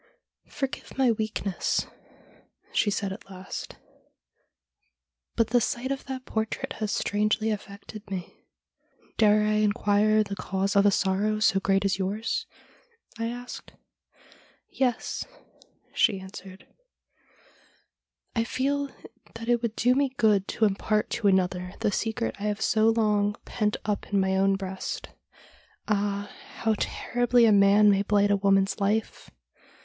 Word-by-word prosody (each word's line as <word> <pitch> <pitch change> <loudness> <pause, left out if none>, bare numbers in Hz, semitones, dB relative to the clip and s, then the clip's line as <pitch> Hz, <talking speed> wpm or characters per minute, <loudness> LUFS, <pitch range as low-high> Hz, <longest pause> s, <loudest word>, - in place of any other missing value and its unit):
' - - -65
Forgive 270 -1 -5
my 260 -3 +4
weakness,' 215 -4 -1 0.9
she 210 - +2
said 200 -1 -2
at 195 - -12
last, 185 0 -7 0.8
' - - -54
but 230 -2 +2
the 245 +1 +3
sight 245 +4 -2
of 275 - -4
that 260 -1 -6
portrait 220 0 -3
has 215 -2 -1
strangely 215 +2 +1
affected 205 +1 -8
me.' 185 -3 -7 0.3
' - - -35
Dare 210 -1 +5
I 215 0 +2
inquire 215 0 +3
the 200 -1 -6
cause 195 +1 -2
of 200 0 +5
a - - +7
sorrow 200 +2 +1
so 215 -3 +3
great 195 +1 +1
as 195 -1 +1
yours? 205 +4 -2 0.4
' 465 - -26
I 230 - -1
asked. 245 +1 -7 0.5
' - - -28
Yes,' 250 -3 0 0.7
she 195 - +2
answered, 190 0 -11 1.0
' - - -38
I 230 - +2
feel 280 +4 -1 0.5
that 230 0 -7
it 240 -1 +2
would 230 -2 -2
do 245 +2 +3
me 270 0 0
good 210 -5 +3
to 225 - +1
impart 210 +1 0
to 235 -4 0
another 180 -1 +1
the 205 - +2
secret 225 +3 -2
I 205 - -4
have 210 0 -1
so 220 0 +3
long 210 -2 +2
pent 210 -3 -1
up 210 -1 -2
in 200 - +3
my 190 0 +1
own 195 +1 +3
breast. 190 -1 -5 0.8
Ah, 205 -1 -1 0.2
how 225 -1 +1
terribly 245 0 +2
a 220 - +5
man 205 +1 +6
may 195 0 +2
blight 205 0 +2
a - - +5
woman's 195 0 +2
life 210 +2 -1
210 Hz, 150 wpm, -27 LUFS, 195-230 Hz, 1.0 s, a